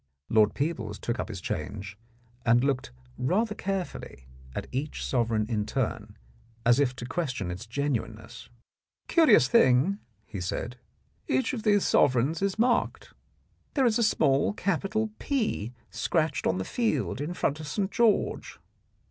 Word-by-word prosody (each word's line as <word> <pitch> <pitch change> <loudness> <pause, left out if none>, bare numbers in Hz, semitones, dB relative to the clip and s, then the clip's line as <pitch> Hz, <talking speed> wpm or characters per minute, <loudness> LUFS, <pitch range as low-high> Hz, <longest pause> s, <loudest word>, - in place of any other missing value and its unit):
Lord 110 -1 +4
Peebles 125 -9 -2
took 120 0 -3
up - - -3
his 100 -4 -5
change 100 +5 -5 0.5
and 120 +1 +4
looked 135 - 0 0.3
rather 210 - +1
carefully 190 - -4 0.3
at - - -3
each 140 +4 -3
sovereign 115 -4 +1
in 110 -3 0
turn, - - -3 0.5
as 120 +3 +5
if 130 -3 +2
to 120 - -6
question 125 - -2
its 90 +6 -7
genuineness. 140 0 -3 0.6
"Curious 330 -3 +6
thing," 190 - +4 0.3
he 95 - -6
said, 120 +7 -3 0.5
"each 130 0 +1
of 240 - -3
these 205 -2 +3
sovereigns 135 +6 +3
is 195 0 0
marked. 240 +1 +1 0.6
There 270 -3 +3
is 230 -1 +3
a - - +3
small 145 -7 +3
capital 205 +3 -1
' - - -40
P 220 - -1
' 115 - -36
scratched 155 -3 0
on - - +1
the 95 - -3
field 140 - -1
in 165 +5 -3
front 150 -2 0
of 155 - -7
St. 190 +5 -1
George." 225 -1 +1
140 Hz, 150 wpm, -28 LUFS, -, 0.6 s, Curious